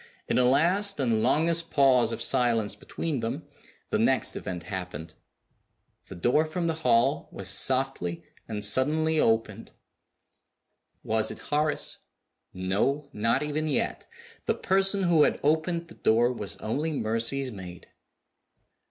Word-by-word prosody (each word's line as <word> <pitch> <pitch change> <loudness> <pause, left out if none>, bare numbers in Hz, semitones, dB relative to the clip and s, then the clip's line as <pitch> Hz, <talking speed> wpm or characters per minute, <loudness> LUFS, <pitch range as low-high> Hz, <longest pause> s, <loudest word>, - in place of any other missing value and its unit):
In - - +1
a 125 - +4
last 180 +9 +2
and 115 -5 +1
longest 165 +5 +2
pause 130 -4 +4
of 115 0 -2
silence 120 -5 +1
between 155 -6 -4
them, 125 +7 -4 0.4
the - - +1
next - - +1
event 90 -3 -5
happened. 90 -4 -6 0.9
The - - -9
door 120 - +2
from 170 +2 -3
the 165 - +1
hall 125 +1 +2
was 95 - -6
softly 100 -3 0 0.2
and 105 -2 0
suddenly 155 +8 +3
opened. 115 -2 0 1.3
Was 110 0 0
it - - -6
Horace? 150 0 0 0.5
No 105 +11 -1
not 115 +6 +1
even 150 +1 -2
yet. 145 - -2 0.4
The - - +2
person 195 +1 +1
who 170 -3 +4
had - - +3
opened 160 +3 0
the 165 - -13
door 120 +3 +2
was 105 -5 -4
only 150 +9 -2
Mercy's 120 +2 -1
maid. 90 -4 -10
130 Hz, 135 wpm, -27 LUFS, 110-155 Hz, 1.3 s, a